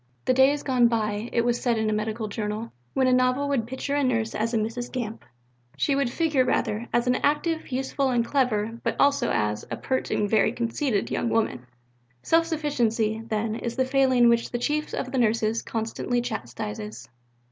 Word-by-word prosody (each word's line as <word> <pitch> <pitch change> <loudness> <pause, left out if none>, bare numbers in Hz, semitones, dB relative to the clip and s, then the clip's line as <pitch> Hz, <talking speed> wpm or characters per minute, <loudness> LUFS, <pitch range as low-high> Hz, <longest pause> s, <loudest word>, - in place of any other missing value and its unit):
The - - +3
day 265 +1 +6
is 290 0 -3
gone 250 -3 +4
by, 215 -1 -1
it 235 0 +1
was 240 0 +1
said 240 -2 +1
in 220 0 0
a 215 - +1
medical 215 +1 -2
journal, 210 +2 -4 0.2
when 265 - +3
a 255 - +4
novel 255 +3 +2
would 245 -5 0
picture 260 +3 -4
a 290 - +2
Nurse 230 -4 0
as 225 +2 -1
a 235 - +1
Mrs. 230 +3 -3
Gamp; 230 -3 -4 0.5
she 285 - +1
would 275 -2 +1
figure, 295 -1 +2
rather, 230 -2 -1
as 240 +1 +1
active, 315 +1 0
useful, 265 +1 0
and 240 -2 +1
clever, 230 -4 0
but - - -1
also 280 -3 +3
as 105 0 0
"a - - -4
pert 260 0 -2
and 205 - +1
very 220 +1 +3
conceited 235 -2 -1
young 235 - 0
woman." 215 - -1 0.6
Self 330 0 +3
sufficiency, 235 -9 0
then, 215 0 -1
is 235 +1 -4
the 260 - +1
failing 260 -2 +4
which 235 0 +3
the 240 - -2
Chief 300 +5 -1
of 255 - -4
the 265 - 0
Nurses 225 -1 +1
constantly 230 +2 -2
chastises. 115 - -5
240 Hz, 190 wpm, -25 LUFS, 220-265 Hz, 0.6 s, day